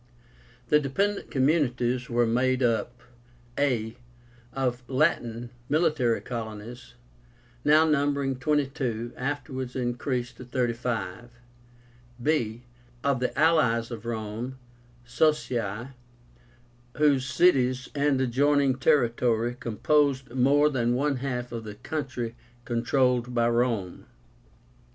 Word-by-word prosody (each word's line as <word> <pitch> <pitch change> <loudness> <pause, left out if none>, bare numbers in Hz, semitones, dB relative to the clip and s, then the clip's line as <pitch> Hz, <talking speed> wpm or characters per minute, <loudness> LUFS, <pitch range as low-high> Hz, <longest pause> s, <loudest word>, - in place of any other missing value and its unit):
The 150 - +5
DEPENDENT 195 +9 -1
COMMUNITIES 130 -3 +1
were 120 0 +2
made 130 +3 +1
up, 120 +1 0 0.5
a. 115 -6 0 0.6
Of 125 -2 -1
the 135 - -9
LATIN 120 -5 0 0.2
(military) 150 -7 +2
COLONIES, 115 0 -7 0.7
now 155 +2 +5
numbering 140 -3 +1
twenty 150 0 +2
two, 125 -5 -4
afterwards 130 -1 -4
increased 125 0 -2
to - - -9
thirty 125 -1 -1
five. 115 -1 -4 0.9
b. 120 -4 0 0.4
Of 140 -3 +1
the 125 - 0
ALLIES 130 -8 +3
of 115 0 -7
Rome 115 +3 -4 0.5
(Socii), 120 -4 0 1.1
whose 145 -3 +3
cities 130 -3 +2
and 145 -2 +1
adjoining 135 +1 +2
territory 120 -3 +2
composed 135 +2 +1
more 140 +4 +3
than 120 -2 +1
one 140 +1 0
half 125 -2 -3
of 115 -1 -5
the 105 -1 -8
country 130 -4 -4 0.3
controlled 125 +1 +1
by 115 -1 +3
Rome. 115 - -1
125 Hz, 105 wpm, -27 LUFS, 120-140 Hz, 1.1 s, The